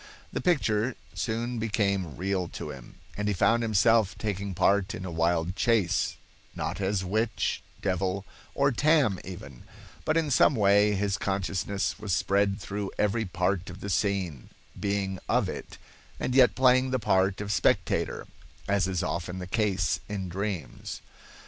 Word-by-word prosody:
The - - -2
picture 125 - +1 0.2
soon 115 +1 -2
became 100 -7 0
real 95 -1 -1
to - - -6
him, - - -11 0.2
and 105 0 -2
he 105 - +1
found 115 +6 +3
himself 110 -1 +3
taking 100 -2 -3
part 100 +3 +2
in 95 - -6
a 90 - -5
wild 85 +2 +1
chase, 105 -4 +1 0.4
not - - -3
as 95 0 0
witch, 110 +3 0 0.2
devil, 95 0 -1 0.3
or 140 0 +3
Tam 140 - +3
even; 70 -9 -9 0.4
but 155 +1 +1
in 160 -3 +1
some 135 +2 +5
way 105 0 +4
his 100 0 0
consciousness 95 +1 -1
was 105 -3 -2
spread 100 +3 +2
through 100 +1 -4
every 110 +2 +1
part 90 0 -1
of 90 +2 -9
the 100 - -4
scene, 90 - -1 0.3
being 100 -2 -1
of - - +2
it, - - -7 0.4
and 130 - -1
yet 130 -2 +6
playing 130 0 +4
the 130 - +1
part 95 -3 +2
of 100 0 -3
spectator, 105 - +1 0.4
as 100 -2 +2
is 95 -2 -1
often 85 +2 -3
the 90 - -5
case 105 0 0
in 95 -3 -3
dreams. 95 - -4
100 Hz, 155 wpm, -28 LUFS, 95-110 Hz, 0.4 s, yet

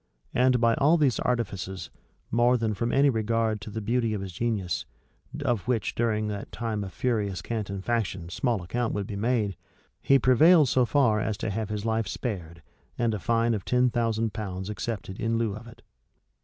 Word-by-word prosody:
And 125 0 +3
by 115 0 +4
all 150 +5 +5
these 140 -6 +2
artifices, 95 -7 -2 0.4
more 120 +2 +4
than 110 -2 -1
from 115 +3 -1
any 140 +2 +4
regard 110 -1 0
to 105 - -7
the 110 +2 -4
beauty 115 0 0
of 100 - -4
his 95 -2 -6
genius, 105 -4 -1 0.6
of 120 -4 0
which, 115 -5 0
during 110 -2 0
that 105 0 -5
time 110 -3 -3
of 95 - -7
furious 100 -7 -1
cant 110 -3 -3
and 100 -1 -5
faction, 105 -7 -1
small 115 +1 -1
account 120 +6 -2
would 100 -1 -2
be 100 - -6
made, 105 -2 0 0.5
he 135 - +5
prevailed 145 +4 +6
so 125 -1 +3
far 125 -7 +3
as 110 -1 -1
to 110 -1 -3
have 110 0 -3
his 105 0 -3
life 110 -2 0
spared, 85 - -5 0.3
and 115 -2 +1
a 105 - -2
fine 115 +4 +1
of 105 -4 -3
ten 125 +2 +2
thousand 115 -2 0
pounds 95 -2 -4
accepted 105 -2 -5
in 115 0 0
lieu 115 -3 0
of 110 +2 -10
it. 115 -1 -15
115 Hz, 195 wpm, -27 LUFS, 100-120 Hz, 0.6 s, prevailed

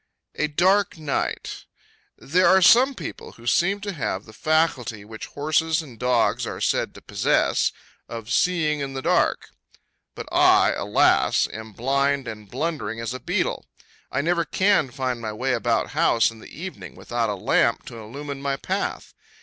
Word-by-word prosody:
A 155 - 0
Dark 185 +6 +2
Night. 150 -3 -3 0.5
There 180 +6 +2
are 190 - +6
some 260 +8 +6
people - - -8
who 115 - -16
seem 195 - +2
to 200 -1 -4
have 105 - -3
the 110 - -14
faculty 130 -8 0
which 110 +1 -8
horses 155 +2 0
and 125 -7 -13
dogs 125 -2 +1
are - - -5
said - - 0
to - - -13
possess,—of 115 +1 -1
seeing 160 -4 +2
in 135 -1 -4
the 135 - -4
dark. - - +1 0.7
But - - -7
I, - - +5
alas! - - +2
am 110 -1 -8
blind 140 +3 0
and 105 -3 -8
blundering 125 -6 -3
as 115 +1 -3
a 130 - -6
beetle; - - -2 0.4
I 140 - 0
never 170 +2 +1
can 185 -1 +2
find 125 -1 -3
my 110 -1 -4
way 130 +4 -1
about 115 -1 0
house 115 -9 +3
in 115 - -14
the - - -12
evening, 185 +4 -8
without 120 -2 -2
a 105 - -1
lamp 95 - +1
to 115 - -9
illumine 140 +5 -7
my 140 -1 -1
path. - - -3
135 Hz, 165 wpm, -24 LUFS, 115-160 Hz, 0.7 s, are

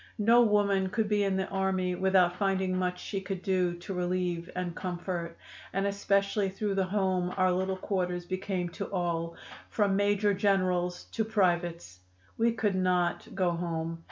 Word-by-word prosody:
No 230 +3 +5
woman 200 -4 +3
could 220 +2 0
be 205 -1 +2
in 195 -1 +1
the 190 - 0
army 190 -1 0
without 185 -1 +3
finding 190 -1 0
much 180 -1 -1
she 195 +1 -4
could 190 -1 -5
do 185 -2 +1
to 175 +3 -7
relieve 180 -1 -1
and 180 -2 -3
comfort, 175 -2 -4 0.4
and 195 +1 0
especially 200 0 +1
through 200 +1 -2
the 195 -1 +1
home 185 -2 0
our 185 -1 +4
little 190 +1 0
quarters 180 -2 -2
became 185 -1 -2
to 195 +3 -6
all, 170 -3 -1 0.3
from 200 -3 +1
major 205 +1 +2
generals 185 -3 +1
to 225 - 0
privates. 175 - 0 0.4
We 230 +1 +2
could 220 -3 0
not 180 -2 +1
go 180 -2 +2
home. 165 -1 -3
185 Hz, 160 wpm, -29 LUFS, 180-200 Hz, 0.4 s, No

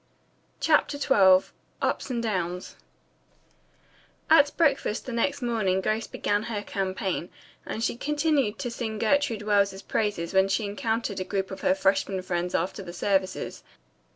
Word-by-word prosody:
CHAPTER 300 -2 +2
XII 190 -10 +4 0.3
UPS - - -1
AND 235 -2 -2
DOWNS 180 -4 -3 1.6
At 290 -2 +7
breakfast 275 -8 +1
the 255 - -5
next 270 +4 -1
morning 215 -6 +1
Grace 215 +3 -1
began 205 0 -1
her 215 -2 -4
campaign, 190 -3 -3 0.4
and 225 - -3
she 230 - -1
continued 295 -5 +1
to 245 - -4
sing 225 -2 -4
Gertrude 230 -1 +1
Wells's 200 -2 +1
praises 205 -5 -1
when 190 0 +4
she 195 +3 0
encountered 215 0 -2
a - - -1
group 195 0 -3
of 190 - -7
her 280 0 +3
freshmen 195 -7 +1
friends 180 -1 -2
after 190 - -1
the 175 -2 -8
services. 190 +1 -1
210 Hz, 145 wpm, -26 LUFS, 190-240 Hz, 1.6 s, At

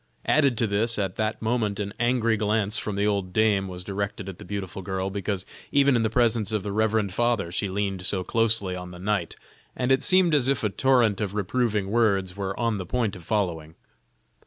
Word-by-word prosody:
Added 140 -6 +3
to 115 - +2
this, 110 +3 +1
at 95 -3 -2
that 110 0 -2
moment 110 -3 0
an 100 0 -3
angry 120 -2 +2
glance 105 0 0
from 105 - -4
the 100 +1 0
old 100 -3 -1
dame 105 -2 +2
was 90 -1 -6
directed 100 +1 -4
at 95 -2 -8
the - - -9
beautiful 95 -2 -5
girl, 95 +1 -3
because 100 -1 -3 0.3
even 140 -1 +4
in 115 - +2
the 110 - +1
presence 115 -2 +1
of 105 -3 -1
the 100 - -4
reverend 110 -2 +1
father 115 -6 0
she 100 +3 -1
leaned 95 -1 -2
so 95 0 +3
closely 110 -3 +2
on 90 0 -7
the 90 - -10
knight, 95 -1 -2 0.4
and 125 +1 -1
it 135 0 +4
seemed 185 +1 +4
as 140 -4 +3
if 135 -5 +1
a 105 - +2
torrent 120 -3 +2
of 100 -1 -3
reproving 105 -1 -1
words 100 -5 +1
were 95 -1 -4
on 115 -3 0
the 95 - -5
point 115 -3 -1
of 90 - -11
following. 85 -5 -2
105 Hz, 210 wpm, -25 LUFS, 95-115 Hz, 0.4 s, even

